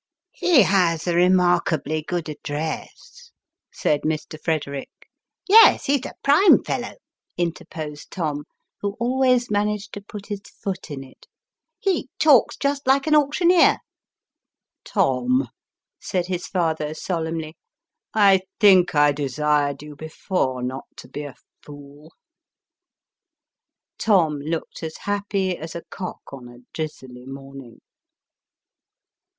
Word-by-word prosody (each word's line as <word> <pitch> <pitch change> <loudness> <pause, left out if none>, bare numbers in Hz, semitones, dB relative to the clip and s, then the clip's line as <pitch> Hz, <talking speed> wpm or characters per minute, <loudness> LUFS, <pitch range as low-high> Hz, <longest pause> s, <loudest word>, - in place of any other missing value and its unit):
" - - -67
He 355 - +4
has 175 -4 +2
a 175 - 0
remarkably 175 -4 +2
good 170 +1 -4
address," 155 - -6 0.4
said 150 - 0
Mr. 155 0 -3
Frederick. 140 -4 -2 0.3
" - - -44
Yes, 445 +3 +7
he 280 0 +2
is 255 - -10
a - - -10
prime 305 +8 +6
fellow," - - -4 0.4
interposed 160 -3 -5
Tom, 150 -5 -3 0.3
who 200 0 -4
always 250 -1 +2
managed 210 0 -1
to 205 - -6
put 205 0 -10
his 205 -1 -5
foot 195 -3 -7
in 140 -2 -6
it 130 - -18 0.3
" - - -62
he 340 -8 +1
talks 290 -6 +4
just 280 -1 -2
like 270 +1 +3
an 310 - +1
auctioneer." 330 +4 +4 0.6
" - - -66
Tom! 255 +2 +1 0.3
" - - -67
said 180 -3 -1
his 180 -1 -4
father 160 -4 -1
solemnly, 160 -2 -3 0.4
" - - -63 0.2
I 190 -1 +4 0.2
think 185 -6 +5
I 145 0 +5
desired 145 0 0
you, 150 -1 -10
before, 145 -4 -2
not 130 +2 -4
to - - -12
be 145 - -6
a 140 - -9 0.3
fool." 145 +2 -13 1.9
Tom 165 -9 +2
looked 160 +3 -5
as 160 -1 -6
happy 200 -2 -1
as 160 0 -8
a 170 - -6
cock 180 -6 -8
on 130 -3 -9
a 120 0 -14 0.2
drizzly 130 -5 -7
morning. 135 -2 -11
170 Hz, 135 wpm, -23 LUFS, 150-205 Hz, 1.9 s, Yes